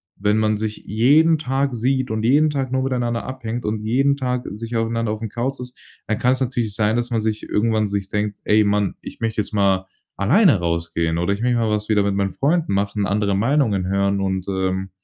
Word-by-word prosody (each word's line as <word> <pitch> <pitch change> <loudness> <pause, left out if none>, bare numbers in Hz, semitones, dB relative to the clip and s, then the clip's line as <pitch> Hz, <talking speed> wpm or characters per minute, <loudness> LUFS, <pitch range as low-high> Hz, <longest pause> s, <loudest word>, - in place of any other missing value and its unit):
wenn 105 +2 +1
man 110 -1 +1
sich 110 0 -3
jeden 150 +10 +4
Tag 135 -1 -1
sieht 130 +1 0
und 110 - -1
jeden 145 +6 +4
Tag 135 -3 -2
nur 130 0 0
miteinander 120 -3 -1
abhängt 120 -2 -5
und 105 0 -2
jeden 135 +6 +2
Tag 125 -2 -2
sich 115 +3 -6
aufeinander 115 -1 -1
aufm 110 +1 -4
Couch 125 +5 -3
ist, 125 0 -9 0.3
dann 110 - -2
kann's 125 +1 +2
natürlich 120 -5 -1
sein, 110 0 +1
dass 120 0 -1
man 115 -2 0
sich 110 0 -2
irgendwann 110 0 +1
sich 100 -1 -3
denkt: 105 0 -2
„Ey, 105 +1 +4
Mann, 100 -1 +1
ich - - -10
möchte 110 -1 0
jetzt 105 - -8
mal 95 -2 +2 0.3
alleine 140 - +4
rausgehen 85 -1 -1
oder 90 +3 0
ich 100 - -5
möchte 120 0 +2
mal 115 -2 +1
was 105 0 -2
wieder 105 -2 +3
mit 100 0 0
meinen 100 0 0
Freunden 160 - 0
machen, 100 0 0
andere 100 0 0
Meinungen 110 -4 +1
hören 100 0 +1
und, 95 -1 -2
ähm, 95 0 -2
110 Hz, 210 wpm, -21 LUFS, 100-125 Hz, 0.3 s, jeden